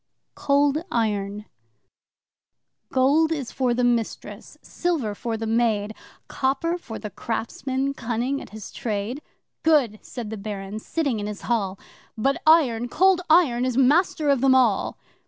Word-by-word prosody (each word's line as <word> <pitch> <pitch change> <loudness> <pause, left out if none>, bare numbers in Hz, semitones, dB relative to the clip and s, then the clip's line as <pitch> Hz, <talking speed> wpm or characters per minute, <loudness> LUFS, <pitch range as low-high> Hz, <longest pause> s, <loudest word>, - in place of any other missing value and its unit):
Cold 285 +2 +2
Iron 210 -2 -1 1.5
'Gold 285 +5 +3
is 285 -7 -3
for 255 -2 0
the 250 - 0
mistress 235 -2 -2
silver 315 -12 -2
for 225 +2 -4
the 225 - -4
maid! 220 -2 +1 0.3
Copper 280 +6 -1
for 225 -8 -8
the 210 - -7
craftsman 260 +6 -3
cunning 245 +2 -2
at - - -10
his 215 -2 -9
trade.' 220 +5 -3 0.4
'Good!' 270 -10 +3
said 230 -4 -7
the 220 - -4
Baron, 200 0 -6
sitting 275 -2 -2
in 205 - -3
his 210 -1 -6
hall, 200 -5 -1 0.4
'But 270 +5 0
Iron 245 -8 +4
Cold 375 +5 +3
Iron 300 -8 +4
is 255 -1 -1
master 295 +3 +3
of 270 -3 +1
them 265 -1 +5
all! 240 -6 +2
245 Hz, 140 wpm, -24 LUFS, 220-280 Hz, 1.5 s, them